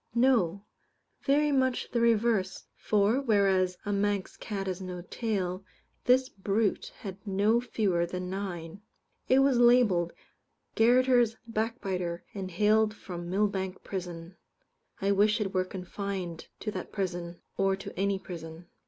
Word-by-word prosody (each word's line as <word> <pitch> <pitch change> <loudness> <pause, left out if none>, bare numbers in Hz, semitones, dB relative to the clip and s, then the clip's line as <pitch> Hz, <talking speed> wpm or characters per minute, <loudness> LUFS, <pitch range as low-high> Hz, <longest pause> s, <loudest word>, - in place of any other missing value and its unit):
No; 220 -6 +3 0.6
very 295 +1 +3
much 260 -2 +1
the 235 - +1
reverse, 225 -4 +2
for, 215 +5 +2
whereas 195 -6 +2
a 205 - -1
Manx 200 -1 0
cat 200 -3 -4
has 190 0 -3
no 180 -1 -6
tail, 190 -3 -2 0.4
this 255 +1 +4
brute 200 0 -1
had 195 -3 -6
no 205 +4 +2
fewer 190 -8 0
than 180 +1 -4
nine. 185 -1 -5 0.5
It 265 +1 +6
was 270 -3 +3
labelled 235 -8 +4 0.6
"Garotters 245 0 +4
back 230 +1 -2
biter," 180 -3 -3
and 195 -2 -5
hailed 215 +4 +3
from 175 -4 -7
Millbank 190 -1 -1
prison. 175 -2 -6 0.6
I 195 0 +1
wish 210 +2 +3
it 200 -2 -2
were 185 -1 +1
confined 185 -2 -5
to 215 - -2
that - - -6
prison, 175 -3 -3 0.2
or 195 0 +2
to 195 - -8
any 195 +1 +1
prison. 170 -3 -9
200 Hz, 135 wpm, -29 LUFS, 185-225 Hz, 0.6 s, It